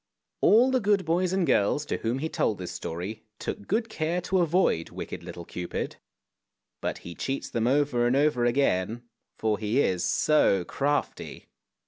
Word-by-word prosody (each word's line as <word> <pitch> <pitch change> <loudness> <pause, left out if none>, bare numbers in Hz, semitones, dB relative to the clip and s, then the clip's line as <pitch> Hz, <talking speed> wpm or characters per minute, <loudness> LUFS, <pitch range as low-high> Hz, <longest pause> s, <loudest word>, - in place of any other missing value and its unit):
All 245 +5 +6
the 260 - +3
good 205 -3 +2
boys 175 +2 +1
and 190 -2 +1
girls 145 +4 +2
to - - -2
whom 115 +3 -1
he 155 +4 -2
told 110 -9 0
this 90 -1 -6
story 90 +4 -5 0.2
took 100 - -5
good 225 +3 0
care 170 -4 -1
to 185 +1 0
avoid 170 - +2
wicked 90 - -7
little 85 -1 -8
Cupid, 90 +1 -5 0.8
but - - -2
he 85 - -6
cheats 135 +9 -4
them 115 0 0
over 130 -3 +2
and 125 - +2
over 145 -3 +2
again, 120 -3 +1 0.3
for 110 -2 0
he 110 +4 0
is 90 -9 +1
so 100 - +3
crafty. 145 +9 -2
130 Hz, 165 wpm, -27 LUFS, 100-170 Hz, 0.8 s, All